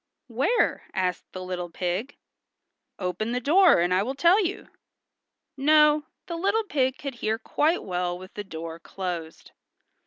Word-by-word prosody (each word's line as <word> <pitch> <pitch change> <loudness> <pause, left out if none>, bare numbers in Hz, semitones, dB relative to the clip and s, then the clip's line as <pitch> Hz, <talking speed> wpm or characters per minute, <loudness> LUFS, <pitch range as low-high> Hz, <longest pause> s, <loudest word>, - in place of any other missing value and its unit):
"Where?" 270 - +1
asked 185 -2 -2
the 185 - -7
little 180 -1 -4
pig. 180 +10 -3 0.8
"Open 205 +5 -2
the 250 - 0
door 335 - +5
and 175 +1 +2
I 185 - +3
will 255 +6 -3
tell 345 +8 +5
you." 375 +3 -4 0.9
No, 300 +1 +4 0.2
the 340 - -5
little 400 +6 +1
pig 265 -9 0
could 275 -1 -5
hear 220 +1 0
quite 310 +8 0
well 180 -1 -2
with 185 +1 -12
the 205 - -5
door 165 -3 -7
closed. 170 -3 -6
220 Hz, 150 wpm, -26 LUFS, 180-300 Hz, 0.9 s, door